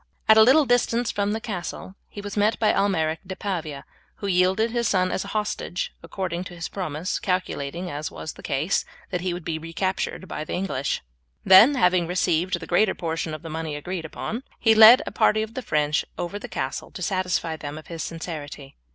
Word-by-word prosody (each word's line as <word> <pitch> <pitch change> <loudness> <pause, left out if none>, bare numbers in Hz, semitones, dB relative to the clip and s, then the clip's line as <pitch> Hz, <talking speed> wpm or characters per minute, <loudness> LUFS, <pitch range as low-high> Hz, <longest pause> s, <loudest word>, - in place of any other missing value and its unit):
At 220 - +8
a 220 - +8
little 270 +7 +6
distance 245 -1 +2
from 205 0 -1
the 220 - -1
castle 190 -3 -6 0.2
he 205 - -8
was 205 0 -6
met 210 +1 +2
by 215 - +3
Almeric 165 -5 +1
de 190 0 -6
Pavia, 160 -9 -4 0.3
who - - -7
yielded 190 +4 +2
his 235 -1 0
son 185 -1 +2
as - - -1
a - - -9
hostage 210 -4 -3
according 180 -2 -4
to 175 - -9
his 165 -2 -5
promise, 175 -2 -3
calculating, 180 -2 -2
as 150 +2 -4
was 155 - -7
the - - -13
case, 150 +8 0 0.3
that 180 -2 -1
he 185 0 -1
would 175 -1 -6
be 160 -2 -2
recaptured 185 +3 -3
by - - -4
the - - -6
English. 180 -8 -2 0.4
Then, 210 +10 +8
having 180 -7 +3
received 180 0 +1
the 165 - -8
greater 190 +3 +2
portion 165 -2 -3
of 155 - -11
the 165 - -7
money 160 -1 -4
agreed 175 +4 -5
upon, 225 +8 -5 0.2
he 225 -1 +5
led 220 +3 +9
a - - -5
party 215 0 +3
of 220 +1 -7
the 260 - -4
French 150 -7 +1
over 185 +4 -4
the - - -7
castle - - -4
to - - -7
satisfy 180 -4 -1
them 150 -1 -7
of 155 - -10
his 165 -1 -6
sincerity. 150 -4 -7
180 Hz, 205 wpm, -24 LUFS, 160-205 Hz, 0.4 s, led